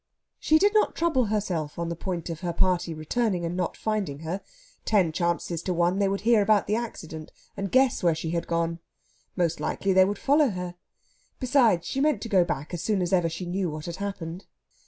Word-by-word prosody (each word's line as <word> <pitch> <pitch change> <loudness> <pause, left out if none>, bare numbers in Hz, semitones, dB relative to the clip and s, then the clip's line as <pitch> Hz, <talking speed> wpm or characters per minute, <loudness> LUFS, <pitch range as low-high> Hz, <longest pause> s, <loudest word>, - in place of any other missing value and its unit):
She 315 - +4
did 405 +5 +3
not 430 - +3
trouble 320 -7 +2
herself 190 -8 -2
on 170 0 -2
the 170 - -3
point 175 -1 -4
of 165 - -6
her 175 -1 -3
party 180 -1 +1
returning 175 +4 -1
and 170 +1 -3
not 180 -2 -2
finding 200 -10 -2
her. 170 +5 -4 0.4
Ten 190 -7 +2
chances 170 0 -1
to 180 0 -2
one 175 +3 +2
they 200 - +3
would 195 0 -1
hear 225 -1 +4
about 205 0 +3
the 210 - 0
accident, 160 -9 -6 0.2
and 195 -1 -4
guess 260 -1 +3
where 170 -3 +3
she 160 0 -4
had 170 0 -2
gone. 170 0 -1 0.6
Most 170 -3 0
likely 195 -1 0
they 185 0 +6
would 200 +1 -2
follow 285 +3 +3
her. 180 -3 -5 0.7
Besides, 245 -9 +3
she 270 - -2
meant 290 -8 +2
to 230 - -5
go 190 -4 +5
back 150 -1 -4
as 175 - -3
soon 210 -3 0
as 180 0 -1
ever 175 -3 +3
she 165 +3 -5
knew 180 +1 -1
what 155 0 -6
had 170 0 -5
happened. 190 -2 -5
185 Hz, 215 wpm, -26 LUFS, 170-215 Hz, 0.7 s, they